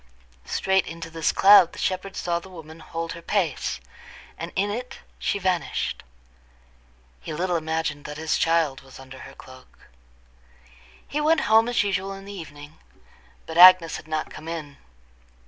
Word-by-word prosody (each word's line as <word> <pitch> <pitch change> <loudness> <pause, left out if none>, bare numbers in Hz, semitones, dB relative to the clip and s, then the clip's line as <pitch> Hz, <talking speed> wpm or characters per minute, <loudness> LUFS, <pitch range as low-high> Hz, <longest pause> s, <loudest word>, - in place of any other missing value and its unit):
Straight 190 0 +1
into 165 0 -8
this 165 -1 0
cloud 195 -3 +6
the - - -12
shepherd 190 +1 -3
saw 170 -1 -1
the 190 - -14
woman 160 -3 -12
hold 165 +1 -5
her 170 - -10
pace, 180 -3 -1 0.6
and 165 +1 -7
in 200 +2 0
it 250 +4 -6 0.2
she - - -1
vanished. 185 -3 -2 1.2
He - - -8
little 180 +2 -1
imagined 160 -2 -2
that 150 0 -7
his 160 0 -1
child 165 -5 +1
was 135 -1 -15
under 135 0 -12
her - - -11
cloak. 130 0 -16 1.2
He 300 - -2
went 315 +1 +3
home 225 +2 +4
as 240 - +2
usual 195 -1 -2
in 195 0 -10
the 200 - -9
evening, 155 -4 -11 0.7
but 165 +1 -3
Agnes 180 -2 +8
had - - -13
not 155 -1 -3
come 155 - -10
in. 155 -4 -6
170 Hz, 160 wpm, -24 LUFS, 155-190 Hz, 1.2 s, Agnes